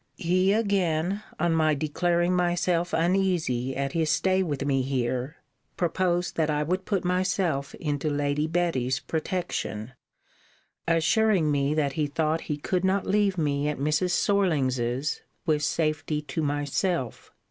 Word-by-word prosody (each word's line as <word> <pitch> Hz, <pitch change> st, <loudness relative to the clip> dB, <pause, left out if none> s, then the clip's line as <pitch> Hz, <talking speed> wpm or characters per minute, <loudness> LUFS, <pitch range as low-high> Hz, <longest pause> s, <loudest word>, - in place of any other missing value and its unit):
He 185 Hz, +3 st, +2 dB
again, 195 Hz, -3 st, +1 dB, 0.2 s
on 170 Hz, +1 st, +2 dB
my 155 Hz, -2 st, +3 dB
declaring 175 Hz, +4 st, +1 dB
myself 175 Hz, 0 st, +1 dB
uneasy 165 Hz, -8 st, +1 dB
at 140 Hz, 0 st, -2 dB
his 160 Hz, 0 st, 0 dB
stay 185 Hz, +4 st, +2 dB
with 145 Hz, -6 st, -2 dB
me 135 Hz, -2 st, +2 dB
here, 130 Hz, +2 st, -2 dB, 0.4 s
proposed 175 Hz, 0 st, 0 dB
that 160 Hz, -1 st, +1 dB
I 150 Hz, 0 st, +1 dB
would 185 Hz, +4 st, -2 dB
put 195 Hz, -4 st, -1 dB
myself 180 Hz, -6 st, 0 dB
into 150 Hz, -1 st, -2 dB
Lady 145 Hz, +1 st, 0 dB
Betty's 155 Hz, -7 st, 0 dB
protection; 160 Hz, -, -3 dB, 1.0 s
assuring 165 Hz, +1 st, +3 dB
me 140 Hz, +1 st, +1 dB
that 145 Hz, -3 st, 0 dB
he 150 Hz, 0 st, 0 dB
thought 155 Hz, +2 st, 0 dB
he 150 Hz, -, -3 dB
could 180 Hz, +5 st, -1 dB
not 190 Hz, +1 st, +1 dB
leave 200 Hz, -1 st, +2 dB
me 145 Hz, -2 st, 0 dB
at 150 Hz, -, -1 dB
Mrs. 150 Hz, +6 st, +1 dB
Sorlings's 140 Hz, -9 st, +1 dB, 0.2 s
with 155 Hz, -3 st, +2 dB
safety 155 Hz, 0 st, 0 dB
to 160 Hz, +2 st, -3 dB
myself. 145 Hz, -, -2 dB
160 Hz, 135 wpm, -26 LUFS, 145-180 Hz, 1.0 s, my